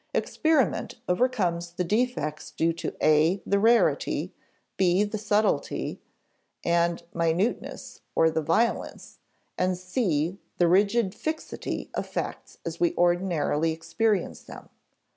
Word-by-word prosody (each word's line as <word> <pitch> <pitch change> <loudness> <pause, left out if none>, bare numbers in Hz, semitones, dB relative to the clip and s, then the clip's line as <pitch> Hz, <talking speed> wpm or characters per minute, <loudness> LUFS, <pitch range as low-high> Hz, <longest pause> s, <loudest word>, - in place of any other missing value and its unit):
Experiment 285 - +1
overcomes 180 -5 0
the 180 - -1
defects 205 - -1
due 165 +1 0
to 165 - -5
(a) 155 +5 +4
the 200 - +2
rarity, 235 - +2 0.4
(b) 185 +1 +3
the 210 +1 -3
subtlety 210 0 0 0.6
and 170 0 +1
minuteness 170 +7 -1
(or 160 0 +4
the 160 - 0
violence), 215 +10 -1 0.4
and 185 0 +1
(c) 180 - -1 0.2
the 175 - +4
rigid 200 +3 +3
fixity 315 0 -4
of - - -3
facts - - -5
as 170 0 -5
we 175 - +2
ordinarily 175 -3 +1
experience 185 +5 -1
them. - - -12
180 Hz, 115 wpm, -26 LUFS, 165-210 Hz, 0.6 s, a